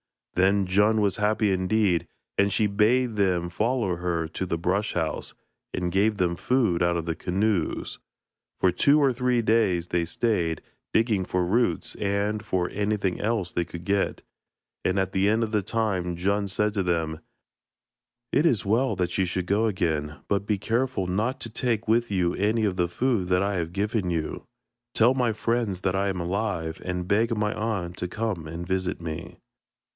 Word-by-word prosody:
Then 95 +2 +3
Djun 105 +4 +3
was 100 -3 +1
happy 105 0 +2
indeed, 95 -1 +1 0.3
and 100 0 +2
she 105 - +2
bade 110 +3 +2
them 90 -4 +1
follow 110 -1 0
her 85 -2 -1
to 95 - -3
the 85 - -1
brush 95 +5 0
house, 80 -3 -2 0.4
and 90 -1 -1
gave 100 +3 +2
them 90 -3 +1
food 115 -6 +1
out 85 0 +2
of 85 - -3
the 85 - -1
canoes; 95 -1 -1 0.6
for 95 - +4
two 140 - +4
or 140 -3 +3
three 125 -1 +1
days 100 -7 +2
they 85 -1 +1
stayed, 85 -4 0 0.3
digging 110 -4 +2
for 90 -1 0
roots 120 +4 +1
and 105 +1 -1
for 95 -4 -1
anything 100 -2 -1
else 105 -5 -1
they 85 - -1
could 85 +1 -9
get, 100 0 0 0.6
and 95 - +1
at 95 -1 0
the 95 +1 +2
end 110 +2 +2
of 110 - -3
the 105 -2 +2
time 95 -4 -1
Djun 100 +3 0
said 105 +2 0
to 100 - 0
them: 80 -3 -1 1.1
'It 150 - +3
is 120 - +2
well 115 +6 +2
that 90 -1 -1
you 95 - +3
should 90 0 -2
go 105 +4 +2
again, 80 -7 -1
but 100 0 0
be 105 - +1
careful 115 0 -1
not 110 +9 -1
to 115 - -6
take 115 -1 -1
with 115 +2 +2
you 90 -3 +1
any 110 +2 +1
of 95 -3 0
the 90 -1 +2
food 110 +1 0
that 90 +1 +2
I 100 -1 0
have 85 -1 -3
given 105 -1 -1
you. 80 -3 -3 0.5
Tell 120 +3 +5
my 125 -4 +1
friends 110 -4 -1
that 95 0 0
I 100 +1 +1
am 95 -2 -2
alive, 85 -3 -2
and 90 -1 -3
beg 110 +3 +2
my 105 0 0
aunt 100 -5 -3
to 90 - -2
come 100 -5 -3
and 85 +2 -6
visit 95 0 -1
me.' 80 -2 -6
100 Hz, 185 wpm, -26 LUFS, 90-110 Hz, 1.1 s, Tell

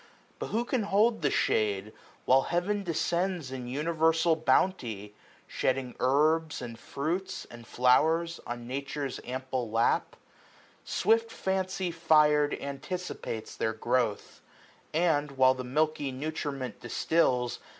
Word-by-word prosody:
But - - -3
who 235 +2 -1
can 250 -1 0
hold 210 +1 +2
the 145 - +2
shade, 105 -4 0 0.3
while 130 +1 +5
Heaven 190 +4 0
descends 175 -3 -1
In 125 -2 -5
universal 160 +4 +2
bounty, 130 - 0 0.3
shedding 130 -1 -1
herbs, 155 +4 +2
180 125 - -5
And 115 - -12
fruits, 165 +7 -3
and 120 -1 -12
flowers, 160 +7 +3
on 120 0 -5
Nature's 140 +1 -4
ample 130 -1 -3
lap? 115 +1 +1 0.7
Swift 225 +1 +2
fancy 190 -1 -2
fir*d 150 -3 +3
anticipates 140 - -5
their 110 - -1
growth; 115 -1 -1 0.5
And, 155 -3 +2
while 130 -1 +5
the 130 -1 -6
milky 150 +2 0
nutriment 140 -3 -4
distils. 125 0 +1
145 Hz, 120 wpm, -29 LUFS, 125-170 Hz, 0.7 s, while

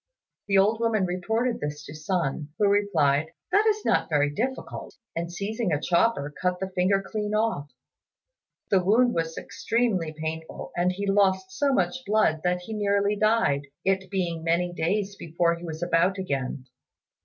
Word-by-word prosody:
The 195 -1 +3
old 210 +3 +4
woman 225 -4 +2
reported 220 +7 -1
this 150 0 -5
to 145 - -9
Sun, 155 -2 -2
who 205 - +3
replied, 160 -7 +2 0.2
"That 415 +4 +4
is 430 -1 +1
not - - +2
very 145 -2 +2
difficult;" 260 - -4 0.2
and, 170 +1 -3
seizing 205 +2 -2
a 150 - +1
chopper, 170 -4 +1
cut 180 -1 0
the 190 0 -4
finger 190 +2 +2
clean 210 -1 -2
off. 215 -10 0 1.0
The 190 -2 +4
wound 235 +6 +4
was 165 -1 -2
extremely 220 -9 -1
painful 160 +1 -6
and 175 +1 +2
he 200 +2 -4
lost 190 -1 +2
so 280 +7 +1
much 260 0 0
blood 205 -7 +2
that 180 0 +1
he 220 +5 -7
nearly 200 -1 +1
died, 215 -10 +2 0.2
it 190 -1 +1
being 175 -4 -2
many 175 +1 +1
days 195 +4 -1
before 170 +1 +1
he 170 +1 -8
was 160 0 -5
about 175 +3 +2
again. 135 -7 -3
185 Hz, 165 wpm, -26 LUFS, 165-210 Hz, 1.0 s, old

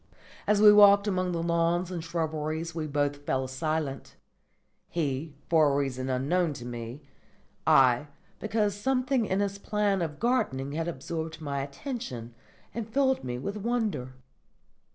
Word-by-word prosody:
As 210 -1 +4
we 210 0 +9
walked 200 0 +7
among 185 -2 0
the 165 -1 -2
lawns 170 +1 +1
and 170 -3 -4
shrubberies 160 0 -2
we 155 -1 -3
both 145 0 0
fell 130 -2 -1
silent: 140 +1 -3 0.7
he, 145 -2 -2
for 155 -3 +4
a - - +1
reason 135 -2 -1
unknown 150 +6 +1
to 120 -3 -9
me; 120 +3 -7 0.6
I, 130 +2 +5 0.3
because 215 -1 0
something 255 +2 0
in 190 +2 +1
his 200 0 -2
plan 205 -2 0
of 155 -3 -3
gardening 140 - 0
had 165 +3 -2
absorbed 160 +1 -5
my 140 -3 -3
attention 140 - -6 0.4
and 230 -2 -5
filled 265 +2 +2
me 125 -1 -3
with 200 +11 -4
wonder. 210 - -2
165 Hz, 145 wpm, -28 LUFS, 140-205 Hz, 0.7 s, we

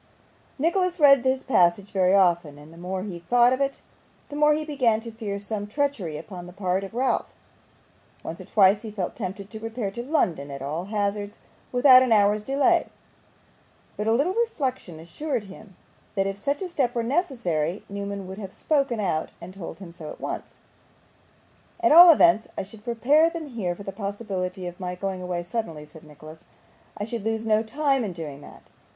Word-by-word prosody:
Nicholas 355 +4 +1
read 275 -3 +7
this 260 +1 0
passage 195 -3 +2
very 185 -1 +3
often, 170 -6 +2
and 150 +2 -14
the - - -15
more 185 +1 -4
he 185 -4 -6
thought 240 +7 +4
of 260 - -2
it 275 0 -1 0.5
the 290 - -7
more 300 0 +4
he 310 0 -3
began 255 -7 +1
to 230 0 -8
fear 215 -3 -5
some 205 0 -4
treachery 220 - -2
upon 180 +1 -9
the - - -10
part 185 0 -1
of 195 +3 -8
Ralph. 260 +2 0 0.9
Once - - -6
or - - -10
twice 200 0 +4
he 225 - -7
felt 200 -4 -4
tempted 195 +2 -6
to 220 - -7
repair 225 -2 -4
to 235 - -5
London 175 - 0
at 140 -1 -7
all 155 +6 -3
hazards 205 0 -2 0.3
without 255 0 +7
an 255 -2 +1
hour's 210 0 +4
delay, 285 +7 +2 1.1
but 210 - -3
a - - +3
little 285 +11 +2
reflection 265 - -2
assured 245 - -4
him 195 0 -13 0.4
that 195 -1 +1
if 195 0 -2
such 280 - -2
a 370 - -4
step 260 -8 0
were 235 - 0
necessary, 230 - -1
Newman 200 -1 -5
would 190 +2 -8
have 195 -3 -7
spoken 275 -7 0
out 175 -6 -1
and 180 +2 -10
told 180 -4 -8
him 190 -4 -10
so 165 -3 -9
at - - -9
once. - - -6 1.2
'At 345 - +3
all 345 +3 +11
events 330 -6 +4
I - - -1
should 210 +2 -13
prepare 275 +8 +3
them 330 -3 -7
here 195 -8 -3
for 200 - -10
the 195 - -5
possibility 195 -2 -4
of 175 +1 -7
my 180 -1 -4
going 190 0 -4
away 180 -1 -3
suddenly,' 170 -6 -4
said 155 +2 -15
Nicholas; 155 +1 -13 0.5
'I 205 - -3
should 230 -1 -5
lose 225 0 -2
no 215 -1 +3
time 270 +3 0
in 200 -4 -4
doing 150 -4 -7
that. - - -15
210 Hz, 195 wpm, -25 LUFS, 180-260 Hz, 1.2 s, all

